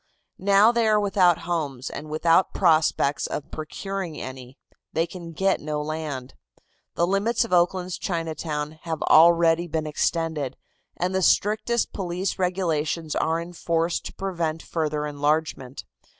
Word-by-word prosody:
Now 200 +3 +5
they 235 -2 +1
are 215 -1 +4
without 190 -4 +3
homes 145 -7 -2
and 155 +1 -7
without 165 +4 +2
prospects 155 -5 +2
of 150 - -5
procuring 175 +1 -5
any. 130 0 -8 0.4
They 165 - +1
can 170 -1 -9
get 190 +4 +1
no 150 0 -3
land. 150 -4 -4 0.6
The 170 - +2
limits 205 +6 +1
of 225 - -5
Oakland's 180 +1 +1
Chinatown 160 -3 -3
have 165 -2 -3
already 170 +1 +5
been 160 -1 -2
extended, 155 -2 -1 0.4
and 180 +2 -1
the 190 - +1
strictest 215 +5 +2
police 185 0 -3
regulations 165 -4 -1
are 160 +1 +1
in 170 +1 -7
force 170 0 0
to - - -9
prevent 170 -4 -3
further 150 -2 -2
enlargement. 145 -2 -1
165 Hz, 135 wpm, -24 LUFS, 155-185 Hz, 0.6 s, Now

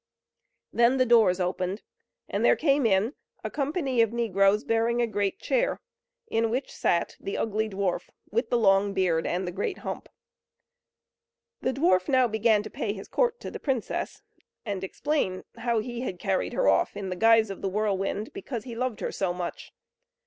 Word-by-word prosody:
Then 240 +3 +4
the 255 - +4
doors 225 -6 +5
opened, 185 +2 -2 0.4
and - - -2
there - - +6
came 280 -5 +3
in 210 +5 +2 0.3
a - - -4
company 275 -4 0
of 225 -2 +2
negroes, 210 -3 +2
bearing 230 +1 +1
a 240 - +3
great 205 -3 -1
chair, - - 0 0.5
in 225 - 0
which 255 +4 -2
sat 170 - 0
the 195 - -4
ugly 220 0 -1
dwarf, 195 -2 -2 0.2
with 470 - 0
the 240 - +2
long 195 -2 +3
beard 175 -4 +1
and 180 +1 -1
the - - -2
great 385 - -3
hump. - - -5 1.5
The 260 - +1
dwarf 185 - +2
now 255 -2 +4
began 220 -1 +2
to 215 - -7
pay 205 - -2
his 195 -2 -9
court 485 -1 +1
to - - -6
the - - -6
princess, 260 -6 -3 0.4
and 200 -3 -3
explain 190 -3 -1
how 235 0 0
he 240 +1 -5
had 190 -8 -4
carried 190 +1 -1
her - - +1
off - - +2
in 195 -2 -4
the 185 - -3
guise 225 +1 +4
of 195 - -8
the 195 - -1
whirlwind, 205 +1 -1
because 275 - -5
he 240 - -7
loved 250 -2 -2
her - - -2
so 180 -3 -1
much. 175 -1 -6
220 Hz, 180 wpm, -27 LUFS, 195-245 Hz, 1.5 s, there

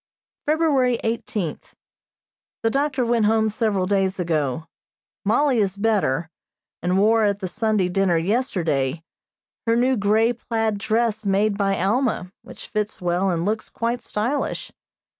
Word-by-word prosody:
February 285 -6 +2
eighteenth: 220 -6 -3 0.9
The 225 - +2
doctor 275 -2 0
went 230 -2 +2
home 220 0 +3
several 210 -3 0
days 195 -1 0
ago. 155 -4 -1 0.6
Mollie 240 +5 +2
is 200 -2 0
better, 190 -8 0 0.5
and 180 +2 +1
wore, 220 +3 +4
at 200 -1 +2
the 195 -2 -4
Sunday 215 -1 0
dinner 180 -1 +2
yesterday, 165 - 0 0.6
her 230 - +4
new 255 +2 +3
grey 220 +2 +2
plaid 225 -3 -2
dress 220 +1 0
made 200 +1 +2
by 195 -1 0
Alma, 200 -1 0
which - - -11
fits 210 0 -3
well 180 +2 0
and 170 -1 -1
looks 215 +2 -2
quite 235 +1 -2
stylish. 245 +6 -2
210 Hz, 135 wpm, -23 LUFS, 185-230 Hz, 0.9 s, wore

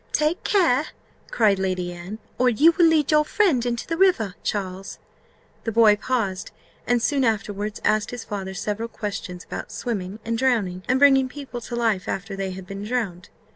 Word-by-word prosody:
"Take 305 +3 +1
care," 330 -9 +3 0.4
cried 205 -4 +3
Lady 185 -2 -2
Anne, 175 +5 -8 0.2
"or 250 0 +4
you 290 +8 +5
will 340 0 +4
lead 315 -3 +3
your 300 0 +5
friend 310 - +2
into 235 -1 -2
the 330 - -3
river, 330 - +3
Charles." 190 -1 -4 0.7
The 225 - -2
boy 220 -1 +6
paused, 210 -4 -2 0.4
and 245 0 +3
soon 275 +3 +1
afterwards 210 -2 -1
asked 215 0 +2
his 245 -2 -6
father 190 -2 -5
several 220 +3 -3
questions 200 -5 -5
about - - -7
swimming 205 -5 -4
and 230 0 -1
drowning, 215 -9 +1
and 260 +1 +3
bringing 270 -2 +5
people 265 -3 -7
to 235 - -6
life 225 -6 0
after 195 +1 -4
they 195 -1 -3
had 185 0 -7
been 195 +2 -7
drowned. 210 -6 -3
225 Hz, 175 wpm, -23 LUFS, 195-260 Hz, 0.7 s, boy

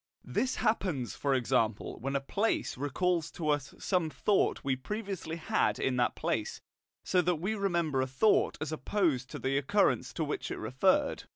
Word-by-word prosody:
This 260 - 0
happens, 180 - 0
for 140 -1 0
example, 115 -4 0
when 135 +4 -3
a - - +3
place 205 +10 0
recalls 160 +5 0
to 155 -3 -3
us 145 -2 -1
some 180 -4 0
thought 200 +5 +1
we 135 -2 +1
previously 190 - -5
had 165 - +1
in 130 - 0
that 120 -2 +1
place, - - -2 0.4
so 180 - +3
that 180 0 +1
we 185 +7 -2
remember 170 -9 0
a 130 - 0
thought 135 +12 +3
as 155 0 -3
opposed 155 -6 0
to - - -6
the 135 +1 0
occurrence 140 - +2
to - - -1
which - - -3
it - - -4
referred. 190 - +1
155 Hz, 175 wpm, -31 LUFS, 135-190 Hz, 0.4 s, a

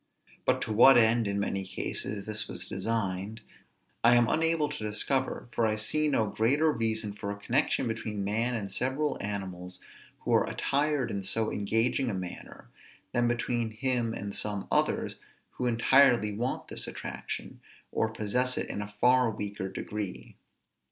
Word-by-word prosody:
But - - +2
to 110 - -3
what 125 +5 +8
end, 115 -1 +4
in 100 0 -1
many 100 -1 -1
cases, 100 +1 -3
this 105 -1 -1
was - - -6
designed, 105 -1 -2 0.6
I 120 +1 +7
am 120 -1 +5
unable 165 -1 +2
to 110 - -6
discover; 125 +6 0
for 115 0 +1
I 110 - +1
see 155 +8 +1
no 125 -7 +2
greater 140 +10 +2
reason 110 -4 -1
for 100 0 -6
a 100 - -3
connection 125 +4 +1
between 110 -3 -3
man 115 +5 0
and 100 -3 -4
several 135 +4 0
animals 95 -3 -5 0.4
who - - -1
are - - +3
attired 140 -3 0
in 100 - -2
so 110 +3 0
engaging 115 +5 0
a 105 - -2
manner, 90 -1 -8 0.4
than 120 -1 +2
between 120 -1 0
him 125 -2 +1
and 100 0 -5
some 105 -2 -2
others - - +1 0.3
who 125 - -2
entirely 120 -2 +4
want 120 +4 -3
this - - -2
attraction, - - -6 0.3
or 110 - +1
possess 120 +4 0
it - - -2
in 105 - -4
a 105 - -5
far 125 0 +5
weaker 100 -2 -4
degree. 100 0 -6
110 Hz, 160 wpm, -29 LUFS, 105-125 Hz, 0.6 s, what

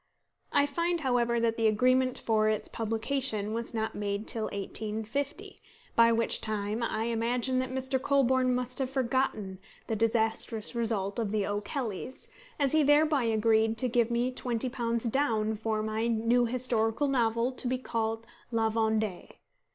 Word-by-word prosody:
I 285 0 +4
find 335 +4 -1
however 240 -3 +1
that 230 -1 0
the 225 -1 +3
agreement 255 +4 +3
for 215 -1 +1
its 215 - -1
publication 225 -1 -1
was 230 +1 -3
not 220 -1 -2
made 205 +1 -3
till 220 -2 -1
1850, 220 - -4 0.3
by 230 0 +6
which 230 0 +2
time 215 +1 -2
I 220 -1 -1
imagine 235 +2 0
that 255 0 -2
Mr. 260 0 -1
Colburn 260 -2 +2
must 250 +1 -4
have 265 -1 -1
forgotten 255 -7 -1 0.3
the 225 - -2
disastrous 225 0 0
result 220 -3 -1
of 215 -3 -1
The 210 -2 0
O'Kellys, 220 - -4 0.3
as 280 -2 +2
he 315 - +4
thereby 290 -2 +4
agrees 220 0 +2
to 255 - +2
give 240 -1 +2
me 240 +2 0
£20 235 -1 -2
down 220 -6 +1
for 220 0 -2
my 220 +1 -1
"new 235 +1 +2
historical 235 +1 0
novel, 235 -2 +1
to 255 - -4
be 255 +1 0
called 225 -2 -3 0.2
La 225 -2 +1
Vendée." 220 -4 -1
230 Hz, 150 wpm, -29 LUFS, 220-255 Hz, 0.3 s, by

